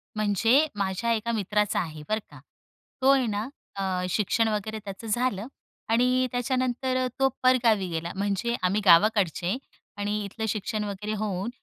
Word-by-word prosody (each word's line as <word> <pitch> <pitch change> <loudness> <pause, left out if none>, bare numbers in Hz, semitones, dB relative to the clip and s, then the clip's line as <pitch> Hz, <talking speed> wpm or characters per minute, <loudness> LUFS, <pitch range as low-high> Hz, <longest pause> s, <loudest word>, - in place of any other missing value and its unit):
म्हणजे 225 - +3
माझ्या 200 +4 -1
एका 230 +1 -1
मित्राचा 210 -1 0
आहे, 155 -3 -5
बरं 215 +1 +1
का? - - -13 0.6
तो 265 - +4
आहे 265 -2 +2
ना 210 +2 -2 0.3
अ, 195 - -2 0.3
शिक्षण 225 +3 +1
वगैरे 215 0 -2
त्याचं 195 +3 -7
झालं 225 -1 0 0.4
आणि 250 +2 +3
त्याच्यानंतर 255 +1 0
तो 270 - +4
परगावी 230 -7 +4
गेला, 170 0 -3
म्हणजे 200 +4 -1
आम्ही 200 +4 +2
गावाकडचे 185 +1 +4 0.4
आणि 205 +1 -1
इथलं 220 +3 -4
शिक्षण 210 +1 -2
वगैरे 210 +1 -4
होऊन 205 0 -2
215 Hz, 145 wpm, -26 LUFS, 200-235 Hz, 0.6 s, तो